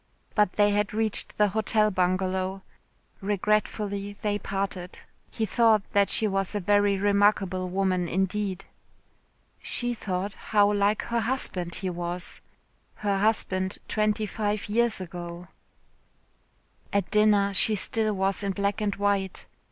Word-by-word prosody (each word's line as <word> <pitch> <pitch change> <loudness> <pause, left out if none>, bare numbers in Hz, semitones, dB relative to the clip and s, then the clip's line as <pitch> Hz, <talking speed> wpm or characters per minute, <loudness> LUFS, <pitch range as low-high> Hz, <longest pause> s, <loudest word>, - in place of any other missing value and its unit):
But 210 -4 +2
they 205 0 +3
had 205 0 0
reached 220 -1 -1
the 210 -1 +4
Hotel 215 +1 +2
Bungalow. 185 +1 -1 0.6
Regretfully 205 0 -1
they 205 0 -2
parted. 195 -2 -4 0.3
He 220 - -2
thought 220 0 +3
that 200 -1 +3
she 220 - +3
was 195 -1 -1
a - - +1
very 205 +1 +3
remarkable 200 -2 +2
woman 185 -1 0
indeed. 190 +1 -1 1.0
She 245 0 0
thought 195 -2 -3
how 205 0 +2
like 205 +1 +1
her 235 0 -1
husband 220 -8 -2
he 190 - -3
was. 175 +1 -4 0.5
Her 200 -2 -1
husband 190 -3 0
twenty 215 0 0
five 210 0 -2
years 235 0 +2
ago. 175 -1 -7 1.4
At 200 -3 -1
dinner 210 -2 +4
she 215 +3 +3
still 215 +2 +1
was 195 +1 +1
in 200 -1 -1
black 200 +3 -1
and 205 -1 0
white. 200 -2 -1
200 Hz, 130 wpm, -26 LUFS, 190-210 Hz, 1.4 s, the